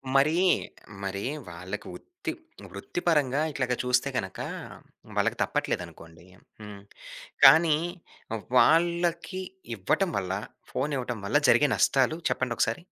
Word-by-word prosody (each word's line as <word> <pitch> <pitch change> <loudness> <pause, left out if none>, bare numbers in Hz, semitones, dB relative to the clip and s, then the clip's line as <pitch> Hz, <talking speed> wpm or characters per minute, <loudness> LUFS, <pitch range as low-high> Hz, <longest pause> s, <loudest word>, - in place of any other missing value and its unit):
మరీ, 155 +5 +4 0.6
మరి 100 +1 -3 0.3
వాళ్ళకి 90 +4 -7
ఉత్తి 360 -2 -7 0.4
వృత్తి 285 - -5
పరంగా 145 -4 +2
ఇట్లాగా 125 -3 -1
చూస్తే 125 +2 +2
గనక, 95 -5 -4 0.8
వాళ్ళకి - - +1
తప్పట్లేదనుకోండి. 80 +1 -4 0.4
హ్మ్. 105 -1 -9 0.6
కానీ, 160 -2 +7 0.8
వాళ్ళకి 170 +4 +2 0.3
ఇవ్వటం 175 - 0
వల్ల, 95 -1 -2 0.4
ఫోనివ్వటం 130 -4 -2
వల్ల 125 +9 +3
జరిగే 145 - +5
నష్టాలు 135 +4 +2
చెప్పండొకసారి? 120 +3 -1
135 Hz, 95 wpm, -27 LUFS, 105-165 Hz, 0.8 s, కానీ